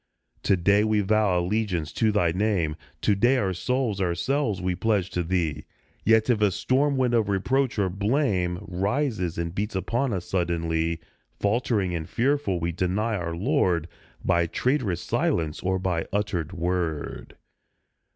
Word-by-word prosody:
To 95 - +2
day 100 +4 +3
we 110 -1 +2
vow 105 -2 +2
allegiance 90 -4 -1
to 110 -2 +2
Thy 90 -5 +2
name; 90 -5 0 0.3
To 105 - +3
day 120 +7 +3
our 95 -6 0
souls, 115 +1 -1
ourselves, 100 - 0
we 90 0 -1
pledge 100 0 0
to 90 - -1
Thee, 85 -4 -1 0.4
Yet 110 0 +4
if 120 -4 +2
a 105 - +5
storm 135 +9 +1
wind 125 -2 +2
of 110 -3 +2
reproach 125 +7 +1
or 100 -2 +2
blame 100 -3 0
Rises 95 - -1
and 85 0 -3
beats 105 +2 -3
upon 120 +8 0
us 90 -4 -3
suddenly, 85 -2 -1 0.4
Faltering 100 -3 +1
and 80 -2 -4
fearful, 130 -7 +1
we 85 +1 -1
deny 95 +6 0
our 85 -3 -3
Lord, 90 - +1 0.4
By 85 0 +3
traitorous 115 - 0
silence 80 -3 0
or 95 0 0
by 90 -3 -1
uttered 95 -5 -1
word. 85 -4 -3
95 Hz, 150 wpm, -26 LUFS, 85-110 Hz, 0.4 s, a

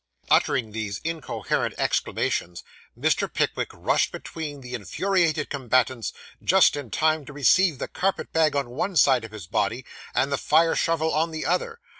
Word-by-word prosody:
Uttering 120 -6 +2
these 105 -2 -4
incoherent 165 -1 -2
exclamations, 85 0 -1 0.4
Mr. - - +1
Pickwick - - -1
rushed - - 0
between 150 -4 -7
the 125 -1 -9
infuriated 170 - 0
combatants 130 -3 0 0.3
just 190 -3 +5
in 145 -5 -6
time 155 +2 +1
to 145 - -9
receive 145 +4 +3
the - - -4
carpet 195 +1 -2
bag 160 -2 +3
on 140 -4 -1
one 180 +9 -2
side 130 -6 +5
of 115 - -8
his 105 -5 -9
body, - - -1 0.3
and 135 +2 +1
the 140 - 0
fire 165 +2 +3
shovel 160 -1 +1
on 160 +2 +1
the 160 -1 -5
other. 475 -1 -1
145 Hz, 160 wpm, -25 LUFS, 125-165 Hz, 0.4 s, just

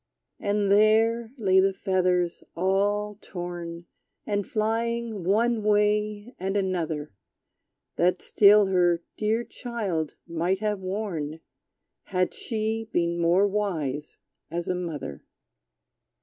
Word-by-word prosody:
And 205 -1 +1
there 220 +2 +4
lay 190 -4 +4
the 195 0 +3
feathers, 180 -3 0
all 205 +3 0
torn. 175 -2 -6 0.4
And 205 -1 -1
flying 225 -1 -1
one 225 +5 +2
way 210 +2 +1
and 190 +2 -1
another, 165 - -2 0.8
That 180 +1 +3
still 210 0 +6
her 175 -3 +2
dear 220 +2 0
child 205 - -3
might 170 +3 0
have 210 0 -1
worn, 185 -6 -3 0.7
Had 185 -2 0
she 220 -1 -2
been 170 0 0
more 175 +4 +4
wise 165 -9 -2 0.3
as 170 +1 -3
a - - +1
mother. 160 - -5
195 Hz, 105 wpm, -26 LUFS, 175-210 Hz, 0.8 s, still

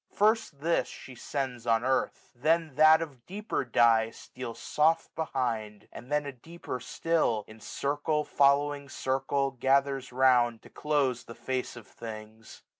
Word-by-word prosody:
First 215 -8 +1
this 170 +2 +1
She 130 - -11
sends 125 -1 -4
on 115 0 +3
earth 130 -1 -1
i - - -29
then 165 0 +2
that 155 +3 +6
of 135 -7 -11
deeper 205 -1 -3
dye 115 -2 +4
165a 115 - -14
Steals 125 -3 -8
soft 160 +2 +1
behind; 120 -9 -3
and 125 +4 -11
then 150 0 +1
a 140 - -4
deeper 135 0 -8
still. 125 -3 0
In 110 +1 -13
circle 145 +6 -1
following 140 0 +2
circle, 135 +1 -1
gathers 135 0 +1
round. 125 -3 +3
To - - -16
close 140 -5 0
the 115 - -10
face 130 -1 -3
of 120 -3 -11
things. 110 0 -10
135 Hz, 155 wpm, -29 LUFS, 120-150 Hz, -, that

